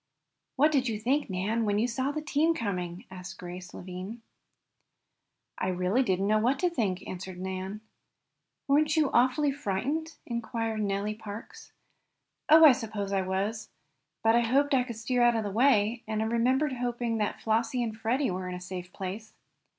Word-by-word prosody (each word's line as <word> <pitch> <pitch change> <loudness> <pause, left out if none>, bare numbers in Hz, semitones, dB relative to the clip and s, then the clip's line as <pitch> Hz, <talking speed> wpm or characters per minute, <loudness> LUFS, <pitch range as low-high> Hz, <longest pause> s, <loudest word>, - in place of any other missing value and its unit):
"What 300 +3 +4
did 270 -4 +2
you 215 -2 -2
think, 265 +6 0
Nan, 200 +5 0
when 205 -1 +1
you 225 +3 +2
saw 260 +3 -1
the 305 +1 -3
team 315 +2 +2
coming?" 180 - -3
asked 185 0 -8
Grace 180 0 -8
Lavine. 185 +5 -7 1.4
"I - - 0
really 185 +6 +1
don't 190 -7 +1
know 215 +1 +3
what 245 +5 +2
I - - -14
did 360 -2 0
think," 190 -7 -1
answered 185 0 -7
Nan. 190 +2 -4 0.9
"Weren't 305 +3 +3
you 300 -3 +3
awfully 260 +4 +3
frightened?" 285 +6 -2
inquired 225 -2 -2
Nellie 200 +1 -1
Parks. 220 - -9 0.8
"Oh, 320 +1 +9
I 300 - +10
suppose 215 -5 -3
I 195 - +2
was. 200 +4 -2 0.5
But 225 0 +5
I 235 - +5
hoped 275 +5 +2
I 260 - +5
could 235 -2 -6
steer 245 +3 0
out 240 -1 +5
of 225 - 0
the 205 - -3
way, 225 -1 +3
and 220 0 -1
I - - -1
remember 250 +6 +2
hoping 240 -2 -2
that 210 - -1
Flossie 230 +2 0
and 220 -2 -3
Freddie 230 +3 0
were 185 0 -4
in 180 - -4
a - - -6
safe 180 0 -7
place." 200 +4 -6
225 Hz, 180 wpm, -29 LUFS, 195-255 Hz, 1.4 s, I